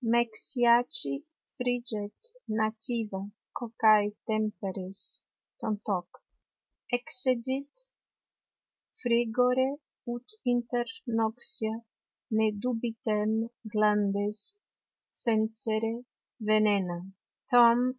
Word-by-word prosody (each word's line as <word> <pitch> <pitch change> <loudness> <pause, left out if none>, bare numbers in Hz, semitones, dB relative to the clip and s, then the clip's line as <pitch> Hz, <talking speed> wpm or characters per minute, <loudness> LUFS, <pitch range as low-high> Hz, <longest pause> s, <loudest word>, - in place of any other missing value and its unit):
"Mexiaci 235 - +3 0.4
friget 240 -4 -2 0.4
nativa 220 -2 -1 0.4
Cocai 220 -3 +4 0.2
Temperies, 200 -3 -2 0.6
tantoq; 205 -5 -2 0.9
excedit 260 +2 0 1.3
Frigore 245 +2 +2 0.4
ut 240 +1 -8 0.3
inter 240 0 -1 0.3
noxia 225 0 +2 0.6
ne 220 0 +4
dubitem 225 -3 -1 0.4
glandes 210 -1 +2 0.8
censere 220 0 +1 0.5
Venena." 205 -5 +3
225 Hz, 55 wpm, -29 LUFS, 215-240 Hz, 1.3 s, Cocai